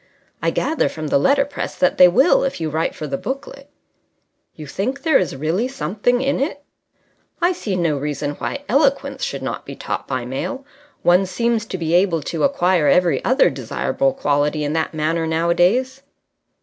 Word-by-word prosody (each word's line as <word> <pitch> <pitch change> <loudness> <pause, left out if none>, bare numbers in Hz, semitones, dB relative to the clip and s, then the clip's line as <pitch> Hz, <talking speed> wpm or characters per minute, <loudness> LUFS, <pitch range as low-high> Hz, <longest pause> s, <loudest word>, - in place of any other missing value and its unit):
"I - - +1
gather 320 - 0
from 155 -1 -6
the - - +3
letterpress 280 - 0
that 180 - +1
they 180 - +10
will 265 - +4
if 270 - -2
you 160 -2 -2
write 160 +2 -1
for 155 - -6
the 140 -2 -3
booklet." 275 +1 -6 0.9
"You 155 - -9
think 255 - -3
there 315 -4 +4
is 175 -7 -2
really 165 - -1
something 245 -1 -1
in 275 0 0
it?" 285 +1 -3 0.8
"I 345 +1 +3
see 215 - -3
no 165 -5 0
reason 145 0 -3
why 145 - -5
eloquence - - +1
should - - -3
not - - -4
be - - -9
taught - - -5
by 130 -2 -3
mail. 260 - -4 0.4
One 180 +2 +4
seems 230 +2 -1
to 185 - -4
be 165 -1 -2
able 175 -3 +2
to 165 +2 -3
acquire 185 - +2
every 175 -6 +3
other 260 +3 +3
desirable 270 0 -1
quality 150 - 0
in 145 +1 -2
that 160 0 -1
manner 160 +1 0
nowadays." 175 +11 +1
180 Hz, 175 wpm, -20 LUFS, -, 0.9 s, they